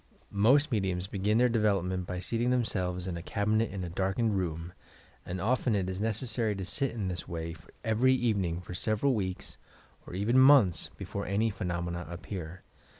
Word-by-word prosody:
Most 135 +9 +4
mediums 95 -5 0
begin 100 +2 0
their 125 +1 +5
de 115 -1 +1
velopment 95 -3 +1
by 90 - -3
seating 115 +6 -1
themselves 95 -8 0
in 90 -2 -3
a - - -5
cabinet 105 +5 0
in 95 -2 -5
a 90 - -4
dark 95 +1 -1
ened 115 -3 +2
room, 85 -2 -3 0.5
and 90 +1 -3
often 115 +3 +1
it 95 -2 0
is 95 +1 -3
necessary 115 0 0
to 95 -1 -4
sit 135 +8 0
in 105 -5 -3
this 90 -2 -4
way 80 -1 -4 0.3
every 125 +3 +3
evening 100 -9 0
for 90 - -8
several 110 +8 +1
weeks 95 -5 -4 0.5
or - - -7
even 110 +7 +3
months 130 - +6
before - - -5
any 105 +4 +1
phenomena 85 -2 -3
appear. 90 0 -7
100 Hz, 180 wpm, -30 LUFS, 90-115 Hz, 0.5 s, months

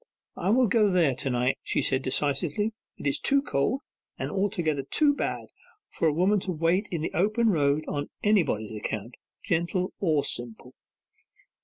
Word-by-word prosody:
'I 180 - -2
will 250 +4 +4
go 215 -1 +3
there 170 -7 +3
to 135 +2 -3
night,' 125 +1 0
she - - -1
said 130 0 +2
decisively. 150 +10 0 0.2
'It - - -9
is 140 - +2
too 280 0 +3
cold, 255 - -1 0.3
and - - -4
altogether 175 -7 0
too 290 - +2
bad, - - -3 0.5
for 165 - 0
a - - +4
woman 185 +7 +2
to 185 - -4
wait 170 +5 +1
in 170 -3 -3
the - - -3
open 215 +6 +2
road 150 -2 +1
on 145 -1 -3
anybody's 160 - +2
account, 110 +2 -4 0.3
gentle 175 +2 -1
or 155 -7 +2
simple. 120 -2 -3
165 Hz, 165 wpm, -27 LUFS, 140-205 Hz, 0.5 s, will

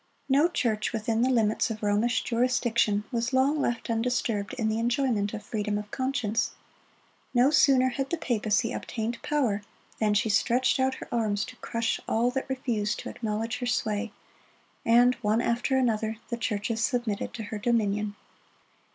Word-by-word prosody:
No 285 +4 +4
church 225 -9 -1
within 225 0 0
the 255 - +3
limits 225 -4 +2
of 220 -1 -5
Romish 210 +4 +1
jurisdiction 235 -3 +1
was 235 +1 -1
long 275 +3 +3
left 240 -3 -1
undisturbed 225 -3 -1
in 225 -3 -1
the 220 +1 0
enjoyment 235 -4 +1
of 215 -1 -6
freedom 210 -1 -2
of 210 0 -6
conscience. 235 -4 -1 0.8
No 250 +4 +5
sooner 265 -4 +5
had 270 +1 -3
the 340 - -1
papacy 225 -4 0
obtained 230 0 -4
power 250 -9 0 0.4
than 210 -1 +2
she 220 +3 +2
stretched 240 +5 +2
out 260 0 +2
her - - -9
arms 215 -3 0
to 255 - -11
crush 230 0 -2
all 235 +2 +2
that 265 0 -3
refused 235 -5 -1
to - - -6
acknowledge 225 +2 -3
her 245 - -2
sway; 220 -2 -1 0.7
and 240 +2 +5
one 215 0 +2
after 245 +3 +1
another, 220 -3 0
the 235 - -2
churches 225 0 -1
submitted 240 -6 -1
to 225 - -5
her 210 0 -5
dominion. 210 -2 0
230 Hz, 160 wpm, -27 LUFS, 215-250 Hz, 0.8 s, No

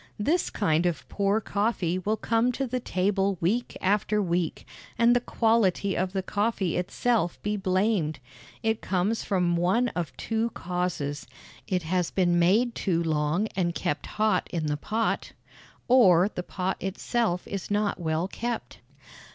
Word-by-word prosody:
This 315 +12 +1
kind 175 -4 +1
of 175 - -3
poor 200 +1 +1
coffee 200 -5 -1
will 210 +4 -1
come 230 +3 +1
to 270 - -2
the 255 0 -2
table 195 -2 0
week 220 +9 -1
after 210 +2 +1
week, 175 -4 -1 0.3
and 235 +1 +5
the - - +4
quality 220 -5 +1
of 185 +1 -1
the 190 -1 -1
coffee 205 -3 0
itself 195 +2 0
be 210 0 0
blamed. 185 -4 +1 0.5
It 220 0 0
comes 195 +4 0
from 180 -3 +1
one 190 +9 +2
of 175 -6 -4
two 225 +1 -1
causes: 170 -6 -3 0.4
It 180 -2 0
has 175 +1 0
been 175 -2 +2
made 215 +8 +3
too 170 -6 0
long 155 +4 +1
and 170 -2 0
kept 145 0 -2
hot 215 0 +2
in 165 -3 -2
the 150 -1 0
pot, 220 +9 -2 0.5
or 195 -8 +6
the - - -3
pot 185 +1 -3
itself 195 -1 -1
is 195 -3 -5
not 205 -2 0
well 160 +1 -1
kept. 235 +3 -5
190 Hz, 150 wpm, -27 LUFS, 175-220 Hz, 0.5 s, or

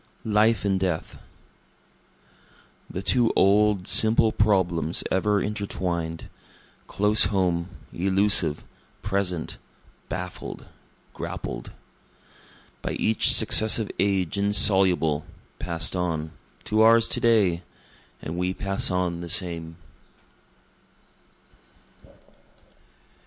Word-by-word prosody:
Life 110 +1 +2
and 95 -1 0
Death 90 -4 -3 1.7
The 95 - -6
two 120 0 +2
old, 100 0 +2
simple 110 0 +3
problems 90 -6 0
ever 105 +2 +1
intertwined, 90 -6 -4 0.6
Close 105 +2 +4
home, 90 -3 -1 0.2
elusive, 95 -4 +2 0.4
present, 90 -4 -3 0.5
baffled, 90 -1 -7 0.5
grappled. - - -7 1.1
By - - -4
each 110 -1 +2
successive 110 0 +3
age 100 -1 0
insoluble, 95 -6 +3 0.4
pass'd 85 0 -2
on, 80 -3 -3 0.3
To 110 +1 0
ours 115 +1 +5
to - - -2
day 100 -8 +2 0.6
and 80 - -5
we 90 +1 -2
pass 95 0 0
on 90 -2 -2
the 85 - -7
same. 85 -3 -2
95 Hz, 85 wpm, -24 LUFS, 85-105 Hz, 1.7 s, ours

